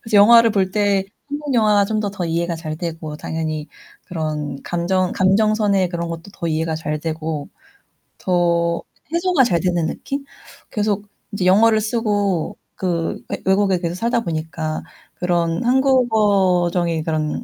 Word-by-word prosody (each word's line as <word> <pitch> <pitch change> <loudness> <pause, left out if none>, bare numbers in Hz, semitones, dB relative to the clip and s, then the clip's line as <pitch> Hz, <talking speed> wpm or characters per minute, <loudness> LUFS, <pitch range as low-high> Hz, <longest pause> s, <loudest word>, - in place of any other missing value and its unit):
그래서 225 -2 0
영화를 230 +3 +7
볼 195 -3 +1
때 200 -2 +2 0.2
한국 290 -1 -3
영화가 210 -3 +4
좀 215 +1 -1
더 200 -3 -3
이해가 170 +1 -1
잘 155 -1 -5
되고 160 -2 -5
당연히 155 -1 -4 0.4
그런 155 -4 -4
감정 180 +1 0
감정선의 200 0 +2
그런 170 -1 -3
것도 165 +3 -7
더 170 - -3
이해가 160 0 -1
잘 155 -1 -3
되고 155 -2 -4 0.7
더 170 -2 +1 0.3
해소가 340 -4 +3
잘 175 -9 +2
되는 175 -2 0
느낌? 275 - -4 0.5
계속 210 -1 -1 0.3
이제 200 -2 -2
영어를 215 +4 +5
쓰고 205 -6 0 0.2
그 170 -3 -2
외 - - -4
외국에 190 -1 +3
계속 170 -1 -2
살다보니까 160 -8 -2 0.3
그런 170 +1 0
한국어적인 200 - +2
그런 155 -1 -2
180 Hz, 280 characters per minute, -20 LUFS, 165-210 Hz, 0.7 s, 영화를